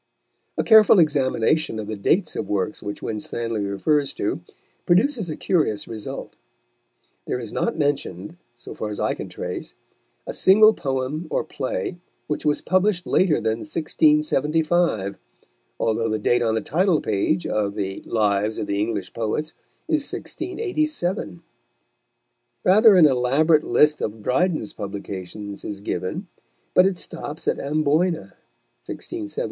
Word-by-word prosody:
A -, -, +1 dB
careful 220 Hz, -2 st, +7 dB
examination 150 Hz, -3 st, +2 dB
of 110 Hz, -, -4 dB
the 110 Hz, +1 st, -4 dB
dates 160 Hz, -, +1 dB
of 100 Hz, -, -4 dB
works 100 Hz, 0 st, -1 dB
which 105 Hz, -, -6 dB
Winstanley 110 Hz, 0 st, -3 dB
refers 140 Hz, +9 st, 0 dB
to, -, -, -2 dB, 0.5 s
produces 205 Hz, -, +2 dB
a 155 Hz, -, -3 dB
curious 150 Hz, -, 0 dB
result. 110 Hz, -2 st, -7 dB, 0.9 s
There -, -, -1 dB
is 115 Hz, -3 st, -7 dB
not 230 Hz, -, -1 dB
mentioned, 145 Hz, -, -2 dB, 0.2 s
so 120 Hz, -, -10 dB
far 110 Hz, -, -4 dB
as 105 Hz, -, -6 dB
I -, -, +1 dB
can -, -, -7 dB
trace, -, -, -6 dB, 0.5 s
a -, -, -5 dB
single 215 Hz, +3 st, +6 dB
poem 135 Hz, +2 st, -3 dB
or -, -, 0 dB
play 155 Hz, +4 st, -4 dB, 0.3 s
which 150 Hz, -, -3 dB
was 150 Hz, -1 st, +2 dB
published 185 Hz, 0 st, +1 dB
later 180 Hz, -5 st, +3 dB
than 110 Hz, -2 st, -1 dB
1675, 155 Hz, -, +1 dB, 0.6 s
although 115 Hz, 0 st, 0 dB
the 110 Hz, -, 0 dB
date 120 Hz, +3 st, +2 dB
on 110 Hz, -2 st, +1 dB
the 110 Hz, -, 0 dB
title 170 Hz, -, +2 dB
page 110 Hz, -, 0 dB
of 105 Hz, -1 st, -1 dB
the 95 Hz, -2 st, -3 dB
Lives 105 Hz, -1 st, +1 dB
of -, -, -2 dB
the 100 Hz, 0 st, -2 dB
English 105 Hz, -3 st, -3 dB
Poets 115 Hz, +7 st, -2 dB, 0.4 s
is 310 Hz, -3 st, 0 dB
1687. 310 Hz, -, -3 dB, 1.2 s
Rather 210 Hz, +3 st, +7 dB
an 175 Hz, -4 st, +7 dB
elaborate 145 Hz, +4 st, +3 dB
list 150 Hz, 0 st, +3 dB
of 105 Hz, 0 st, -4 dB
Dryden's 155 Hz, -, 0 dB
publications 100 Hz, 0 st, -7 dB
is 100 Hz, -1 st, -5 dB
given, 100 Hz, -, -3 dB, 0.5 s
but 185 Hz, -, +6 dB
it 190 Hz, -2 st, -1 dB
stops 155 Hz, -1 st, -7 dB
at -, -, +1 dB
Amboyna 155 Hz, +4 st, 0 dB, 0.5 s
(1673). 330 Hz, -3 st, -7 dB
145 Hz, 140 wpm, -23 LUFS, 105-175 Hz, 1.2 s, careful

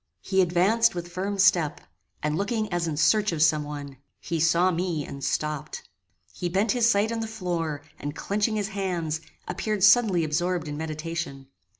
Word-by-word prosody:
He 190 Hz, -, +2 dB
advanced 185 Hz, +6 st, +3 dB
with 175 Hz, 0 st, -5 dB
firm 195 Hz, +3 st, -3 dB
step, 185 Hz, -6 st, +3 dB, 0.4 s
and 150 Hz, 0 st, 0 dB
looking 215 Hz, +2 st, -1 dB
as 175 Hz, -1 st, 0 dB
in 155 Hz, -2 st, -3 dB
search 210 Hz, +6 st, +3 dB
of 155 Hz, -2 st, +1 dB
some 155 Hz, -1 st, +3 dB
one. 145 Hz, -2 st, -7 dB, 0.2 s
He 165 Hz, 0 st, -3 dB
saw 170 Hz, +3 st, +3 dB
me 170 Hz, -4 st, -2 dB
and 140 Hz, 0 st, -8 dB
stopped. 150 Hz, 0 st, -3 dB, 0.5 s
He 175 Hz, -, -3 dB
bent 195 Hz, +4 st, +1 dB
his 235 Hz, -2 st, +3 dB
sight 210 Hz, 0 st, +2 dB
on 230 Hz, -, -2 dB
the 225 Hz, -, -3 dB
floor, 170 Hz, -8 st, -3 dB, 0.2 s
and 145 Hz, +1 st, -5 dB
clenching 210 Hz, +5 st, -1 dB
his 210 Hz, -1 st, -1 dB
hands, 175 Hz, -6 st, -2 dB, 0.3 s
appeared 195 Hz, +2 st, -2 dB
suddenly 200 Hz, -4 st, +5 dB
absorbed 170 Hz, +2 st, -1 dB
in 145 Hz, -, -4 dB
meditation. 155 Hz, -3 st, -5 dB
175 Hz, 175 wpm, -26 LUFS, 155-200 Hz, 0.5 s, suddenly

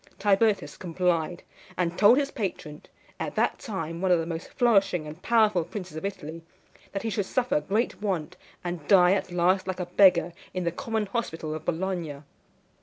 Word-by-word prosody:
Tibertus 205 Hz, +1 st, +2 dB
complied, 175 Hz, -1 st, -1 dB, 0.3 s
and 175 Hz, -1 st, 0 dB
told 210 Hz, +6 st, +6 dB
his 280 Hz, -1 st, 0 dB
patron, 170 Hz, -, -5 dB, 0.4 s
at -, -, -4 dB
that -, -, +1 dB
time 170 Hz, -, -5 dB
one 190 Hz, -, +1 dB
of 180 Hz, -, +5 dB
the 165 Hz, -, -2 dB
most 165 Hz, 0 st, -5 dB
flourishing 195 Hz, -, +2 dB
and 155 Hz, +3 st, -9 dB
powerful 215 Hz, -6 st, +3 dB
princes 180 Hz, -3 st, -7 dB
of 160 Hz, -, -6 dB
Italy, 165 Hz, -5 st, -5 dB, 0.5 s
that 195 Hz, -, -4 dB
he 225 Hz, -, -2 dB
should 200 Hz, -2 st, -1 dB
suffer 245 Hz, -11 st, +1 dB
great 205 Hz, +8 st, -1 dB
want, 180 Hz, -4 st, -2 dB, 0.3 s
and 175 Hz, -4 st, -5 dB
die 180 Hz, -3 st, +6 dB
at 195 Hz, -, -2 dB
last 180 Hz, +2 st, +2 dB
like 185 Hz, 0 st, -3 dB
a 180 Hz, -, -2 dB
beggar 175 Hz, -2 st, +4 dB, 0.2 s
in 185 Hz, -, -1 dB
the 170 Hz, -, 0 dB
common 220 Hz, +4 st, -2 dB
hospital 165 Hz, -8 st, -3 dB
of 155 Hz, 0 st, -6 dB
Bologna. 170 Hz, -4 st, -3 dB
180 Hz, 180 wpm, -27 LUFS, 165-205 Hz, 0.5 s, told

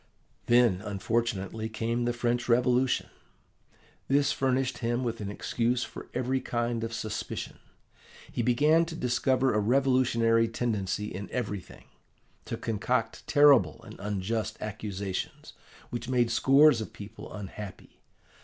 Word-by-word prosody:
"Then, 120 Hz, -6 st, +4 dB
unfortunately, 110 Hz, +1 st, -2 dB
came 115 Hz, +2 st, -1 dB
the 120 Hz, -, +1 dB
French 120 Hz, 0 st, -1 dB
Revolution. 125 Hz, +1 st, +3 dB, 1.0 s
This 140 Hz, +1 st, +3 dB
furnished 130 Hz, -1 st, 0 dB
him 120 Hz, +1 st, -1 dB
with 115 Hz, -2 st, -3 dB
an 100 Hz, -, -4 dB
excuse 120 Hz, +4 st, -1 dB
for -, -, -9 dB
every 130 Hz, +1 st, 0 dB
kind 120 Hz, -1 st, -2 dB
of 115 Hz, -, -3 dB
suspicion. 110 Hz, -2 st, -5 dB, 0.7 s
He -, -, -1 dB
began 145 Hz, +8 st, +4 dB
to 165 Hz, 0 st, -7 dB
discover 130 Hz, -1 st, +1 dB
a 105 Hz, -, +2 dB
revolutionary 115 Hz, -1 st, +3 dB
tendency 105 Hz, -3 st, -2 dB
in 100 Hz, +2 st, -6 dB
everything; 100 Hz, -7 st, -5 dB, 0.6 s
to -, -, -4 dB
concoct 115 Hz, +3 st, -2 dB
terrible 145 Hz, -5 st, +5 dB
and 110 Hz, -1 st, -12 dB
unjust 105 Hz, +2 st, -2 dB
accusations, 100 Hz, -3 st, -5 dB, 0.4 s
which 120 Hz, 0 st, -4 dB
made 120 Hz, -2 st, +2 dB
scores 135 Hz, +2 st, +5 dB
of 110 Hz, -, -7 dB
people 105 Hz, +2 st, -10 dB
unhappy. 105 Hz, -1 st, -9 dB
115 Hz, 125 wpm, -28 LUFS, 110-125 Hz, 1.0 s, terrible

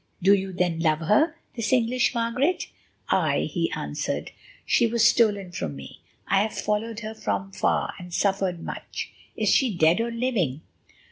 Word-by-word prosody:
Do 195 Hz, +3 st, +5 dB
you 195 Hz, -1 st, 0 dB
then 175 Hz, -2 st, 0 dB
love 155 Hz, -1 st, +2 dB
her—this 240 Hz, -, 0 dB
English 250 Hz, 0 st, +2 dB
Margaret?" 250 Hz, +9 st, 0 dB, 0.4 s
"Aye," -, -, +2 dB
he -, -, 0 dB
answered, -, -, -3 dB, 0.3 s
"she 235 Hz, -, +3 dB
was 230 Hz, 0 st, +4 dB
stolen 205 Hz, -6 st, +2 dB
from 75 Hz, -, -4 dB
me; 70 Hz, 0 st, -11 dB, 0.3 s
I 195 Hz, 0 st, +3 dB
have 215 Hz, +1 st, -2 dB
followed 220 Hz, +2 st, -2 dB
her 215 Hz, 0 st, -5 dB
from 195 Hz, -3 st, -3 dB
far, 195 Hz, -, 0 dB
and 180 Hz, -1 st, -10 dB
suffered 190 Hz, -2 st, 0 dB
much. -, -, -6 dB, 0.3 s
Is -, -, +1 dB
she 260 Hz, -4 st, +4 dB
dead 165 Hz, +5 st, +4 dB
or 235 Hz, -, -1 dB
living?" 230 Hz, -, -1 dB
210 Hz, 155 wpm, -25 LUFS, 180-230 Hz, 0.4 s, Do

